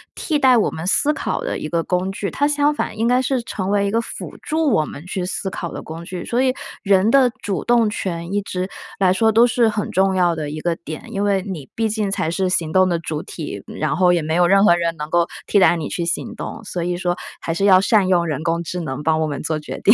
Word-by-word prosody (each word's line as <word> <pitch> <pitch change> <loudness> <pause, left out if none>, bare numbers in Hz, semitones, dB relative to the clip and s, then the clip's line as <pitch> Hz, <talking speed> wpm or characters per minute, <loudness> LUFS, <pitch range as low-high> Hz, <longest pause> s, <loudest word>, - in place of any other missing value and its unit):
替 305 -3 -1
代 260 -3 +5
我 220 - +2
们 160 - -6
思 290 +9 +3
考 - - -2
的 - - -3
一 155 - -5
个 170 0 0
工 180 +2 -1
具， 195 0 -4
它 285 - +1
相 295 0 +2
反 255 - -3
应 225 +2 +1
该 250 +1 +3
是 260 0 0
成 190 -4 -4
为 200 0 +2
一 200 - -1
个 230 +2 +1
辅 - - -8
助 315 -2 0
我 155 -8 +3
们 150 +1 -9
去 185 0 -3
思 190 - -3
考 170 - -5
的 - - -7
工 165 +1 -8
具。 180 0 -6
所 240 +2 0
以， 260 -1 +2 0.3
人 195 +2 +3
的 265 -1 +5
主 195 -3 -2
动 235 -2 +3
权 175 -4 -4
一 205 - +1
直 185 -2 -3 0.3
来 185 -2 +3
说 220 +4 +3
都 230 +2 +6
是 235 -1 +3
很 210 -1 -3
重 190 0 +2
要 175 -2 +2
的 155 -2 -4
一 155 +1 -5
个 170 +1 -1
点， 160 -2 -8
因 200 - -1
为 200 -2 +1
你 175 -9 -7
毕 225 -1 +1
竟 210 -1 -1
才 180 -4 -1
是 185 +2 0
行 165 -3 0
动 185 0 +4
的 170 - +1
主 155 -2 -4
体， - - -7
然 - - -2
后 180 +2 +4
也 175 -2 +1
没 160 +1 -2
有 175 +1 +4
任 195 +2 +5
何 175 - +6
人 170 -1 -1
能 150 0 -4
够 170 0 +3 0.2
替 205 - +3
代 185 -2 +5
你 160 -4 -3
去 175 - -3
行 170 - -2
动。 - - -7
所 180 -4 -4
以 175 0 -1
说 175 -1 -1 0.2
还 165 - -3
是 170 - -2
要 190 -2 +7
善 200 0 +3
用 175 -2 +3
人 155 -1 -3
工 170 +1 0
智 180 +2 -4
能 150 -3 -4
帮 160 0 +2
我 155 - +1
们 145 -2 -4
做 155 0 -1
决 150 - -7
定。 210 - +6
185 Hz, 290 characters per minute, -20 LUFS, 170-215 Hz, 0.3 s, 要